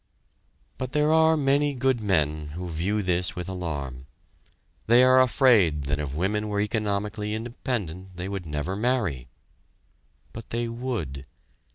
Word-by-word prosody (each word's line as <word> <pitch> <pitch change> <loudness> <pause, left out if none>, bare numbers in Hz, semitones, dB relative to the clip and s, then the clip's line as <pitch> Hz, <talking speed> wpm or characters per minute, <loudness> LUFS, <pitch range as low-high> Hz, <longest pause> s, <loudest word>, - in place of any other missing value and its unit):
But 130 -1 -4
there 150 +1 +3
are 160 0 +5
many 145 0 +2
good 130 -1 +1
men 75 -7 0
who 90 0 -5
view 100 +7 -1
this 90 -1 0
with 90 0 -5
alarm. 70 -8 -5 0.8
They 120 +3 +6
are 130 0 +6
afraid 115 - +4
that 75 +1 -1
if 70 -1 -4
women 105 +6 0
were 105 -1 -1
economically 105 0 -1
independent 105 - -4
they 90 +1 -5
would 95 -3 -5
never 75 +5 -3
marry. 105 - -1 1.1
But 115 -1 -9
they 120 0 -2
would. 115 - -4
100 Hz, 140 wpm, -26 LUFS, 80-120 Hz, 1.1 s, They